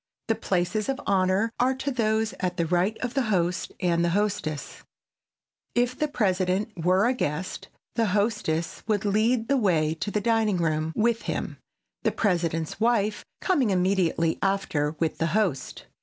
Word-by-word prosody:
The - - +5
places 205 +1 -1
of 270 0 -1
honor 195 +3 +2
are 255 +2 +3
those 225 -5 0
at 180 -1 -2
the 170 - +1
right 180 +6 +1
of 250 -1 -2
the 275 - +1
host 180 -2 0
and 170 -2 +1
the 170 - +2
hostess. 200 -8 -2 0.9
If 245 +1 +2
the 305 - 0
President 195 -5 0
were 185 +4 +4
a 250 - +3
guest, 180 - -3 0.3
the 230 -2 +1
hostess 200 -5 0
would 210 -2 0
lead 220 +3 +2
the 275 - +3
way 165 -9 +2
to 165 +6 -4
the 210 - 0
dining 220 -2 +2
room 160 -2 0
with 230 +1 +2
him, - - -3 0.4
the - - +1
President's 170 -4 -1
wife 215 -2 +1 0.2
coming 285 - +2
immediately 180 -3 +1
after 165 -7 0
with 160 0 -1
the 165 - +1
host. 185 -11 -1
200 Hz, 155 wpm, -26 LUFS, 175-225 Hz, 0.9 s, The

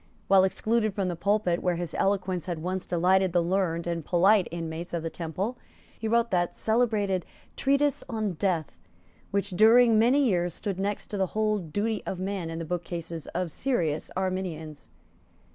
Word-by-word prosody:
While 190 -1 +6
excluded 215 +2 0
from 195 -3 0
the 175 - -2
pulpit 200 -1 +1
where 180 -1 +1
his 170 -2 -4
eloquence 185 -3 0
had 175 -2 -2
once 185 +1 -3
delighted 185 +1 +2
the 175 -1 +3
learned 170 -2 0
and 170 -1 -2
polite 185 +4 +4
inmates 165 +1 -5
of 165 - -3
the 165 - -3
Temple, 180 +9 -4 0.4
he 225 - -2
wrote 235 +1 +2
that 175 -2 +1
celebrated 215 -5 +1 0.3
Treatise 280 +1 +1
on 220 -3 -1
Death 170 -3 -1 0.6
which, 200 0 -1
during 225 +3 +6
many 255 +6 +4
years, 175 -6 +1
stood 195 -3 -4
next 200 +1 -2
to 205 - -2
the 190 - +2
Whole 215 -1 +2
Duty 205 +6 -2
of 190 - -3
Man 185 -2 -3
in 165 - -5
the 165 - -4
bookcases 170 -1 -5
of 180 -2 -1
serious 165 - -1
Arminians. 185 -5 -4
185 Hz, 170 wpm, -27 LUFS, 170-215 Hz, 0.6 s, While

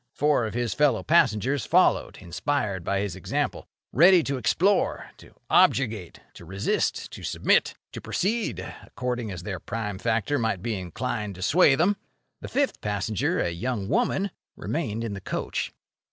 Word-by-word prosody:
Four 145 -5 +2
of 110 - -7
his 120 -1 -1
fellow 145 -6 +2
passengers 135 - +2
followed, - - +3
inspired 100 0 -2
by 100 +2 0
his 100 -3 -3
example, 95 - -2 0.3
ready 175 +4 +7
to 140 -2 -2
explore, 180 - +1
to - - -17
objurgate, 110 -9 +2
to - - -12
resist, 95 +4 -1
to - - -9
submit, - - +2 0.2
to - - -7
proceed, 220 +4 -1 0.2
according 125 -3 -4
as 90 -3 -6
their 95 -2 -4
prime 105 0 -4
factor 115 +6 0
might 110 -5 -1
be 115 - -1
inclined 105 +2 -4
to 90 - -7
sway 145 - +5
them. 185 +8 +2 0.4
The - - -7
fifth 280 0 0
passenger, 105 0 -1
a 85 - 0
young 100 +3 -3
woman, 200 - +1 0.2
remained 115 -8 -3
in 110 -3 -3
the 100 - -6
coach. - - -3
115 Hz, 155 wpm, -26 LUFS, 100-145 Hz, 0.4 s, ready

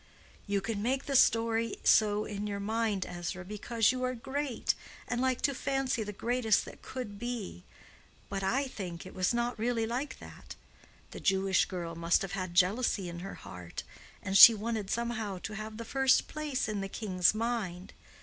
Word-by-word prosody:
"You 200 -1 0
can 205 0 -3
make 260 +5 0
the 280 - -2
story 230 -2 +3
so 210 -1 +4
in 205 0 -4
your 200 -1 -3
mind, 215 -2 -1
Ezra, 175 +1 -5
because 210 +3 +1
you 255 0 -4
are 255 0 -1
great, 265 +1 -2 0.3
and 245 0 -1
like 260 -1 +1
to 280 - +3
fancy 270 -3 -1
the 210 -1 -4
greatest 230 +1 +1
that - - -12
could 210 -6 -7
be. 235 - -5 0.6
But 195 -1 -3
I 245 +9 +1
think 180 -8 -7
it 185 - -10
was 185 -1 +1
not 240 -1 -1
really 230 0 0
like 250 +6 -3
that. - - -11 0.6
The - - -8
Jewish 195 -1 +2
girl 170 -3 -5
must 170 +2 +2
have 195 - -5
had 185 -3 -4
jealousy 195 0 +2
in 170 0 -7
her 195 +2 -7
heart, 90 -1 -8 0.4
and 190 - -2
she 230 +3 +12
wanted 215 -2 -3
somehow 225 -4 -2
to 215 - -5
have 215 0 -6
the 230 - -6
first 265 +2 +3
place 295 -5 -2
in 210 -2 -2
the 195 - -4
king's 185 -2 +1
mind. 215 -6 -3
215 Hz, 180 wpm, -31 LUFS, 195-240 Hz, 0.6 s, she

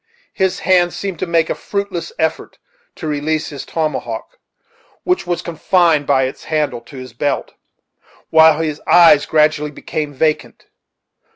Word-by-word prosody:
His 190 -2 -1
hand 175 -2 +2
seemed 195 -5 -5
to 185 - -2
make 165 -1 +2
a - - +2
fruitless 200 - -4
effort - - -2 0.4
to 165 - -8
release 155 +1 -1
his 140 -3 -8
tomahawk, 160 - -4 0.6
which 360 - 0
was 175 -1 -2
confined 165 -2 +1
by 135 -2 +3
its 130 - -5
handle 150 -6 -1
to 135 +3 -13
his 130 -2 -9
belt, 140 +4 -2 0.8
while 160 -1 +6
his 155 -2 -3
eyes 160 -4 +6
gradually 150 -1 +2
became 150 0 -5
vacant. 150 +2 -2
155 Hz, 145 wpm, -17 LUFS, 145-175 Hz, 0.8 s, while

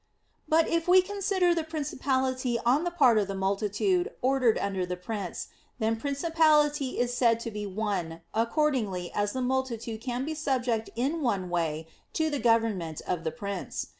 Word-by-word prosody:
But 320 +1 +4
if 335 0 0
we 365 +1 +7
consider 380 -2 +1
the 330 -1 -1
principality 260 -5 -1
on 275 +8 +3
the - - +1
part 265 -10 +4
of 200 - 0
the 195 - -4
multitude 205 - 0
ordered 255 -3 +3
under 195 -2 -1
the 180 0 -3
prince, 195 0 -5 0.3
then 225 -1 +1
principality 295 +1 +2
is 245 0 0
said 235 -2 +3
to 230 - -4
be 210 -1 -4
"one" 185 -5 -3
accordingly 230 - 0
as 205 0 0
the 260 - -2
multitude 240 -4 -2
can 250 +1 -3
be 315 - -3
subject 255 -7 -1
in 280 +8 -1
one 195 -9 -1
way 160 -2 -1 0.3
to 315 -1 0
the 290 - -1
government 225 -10 +1
of 175 -2 -2
the 160 - 0
prince. 200 0 -5
245 Hz, 165 wpm, -28 LUFS, 205-295 Hz, 0.3 s, we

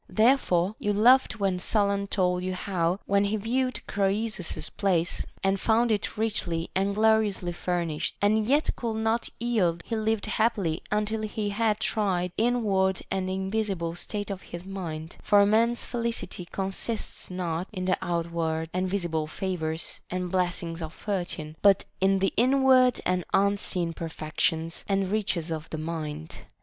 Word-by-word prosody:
Therefore 215 -6 +3
you 205 - 0
laughed 235 +2 +5
when 190 -2 +1
Solon 200 0 +1
told 180 -2 +1
you 185 0 -2
how, 180 -1 -1
when 200 0 +3
he 210 +2 0
viewed 255 +4 -1
Croesus's 200 -1 -1
palace 175 -4 0 0.2
and 195 0 +2
found 230 +3 +3
it 210 0 -1
richly 180 -7 -1
and 195 +1 0
gloriously 215 -4 +2
furnished, 170 -3 -2
he 210 +2 +3
yet 275 +8 +2
could 230 -2 -3
not 220 +1 0
yield 190 -9 +1
he 230 - -2
lived 220 -1 0
happily 210 -6 0
until 210 +1 0
he 215 -1 -2
had 215 +1 +1
tried 185 -5 0
the - - +1
inward 195 -6 +1
and 185 -1 -1
invisible 190 -3 -1
state 205 +4 -3
of 190 -1 -5
his 175 +1 -9
mind; 165 -5 -6
for 205 - +4
a 200 - +6
man's 230 +3 +2
felicity 230 -7 -3
consists 195 +3 -3
not 180 -1 -2
in 185 -4 -4
the 185 - +3
outward 165 -2 -2
and 185 +1 0
visible 170 -5 -1
favors 160 -2 -3
and 180 -1 -3
blessings 175 -2 -1
of 160 0 -5
Fortune, 175 -6 -4
but 200 -1 +5
in 195 +1 +3
the 195 0 +1
inward 255 +1 +5
and 180 0 +1
unseen 195 -4 +2
perfections 160 0 -2
and 195 -1 +1
riches 185 -6 -1
of 160 -1 -4
the 160 - -4
mind. 155 -1 -5
195 Hz, 155 wpm, -27 LUFS, 175-215 Hz, 0.2 s, a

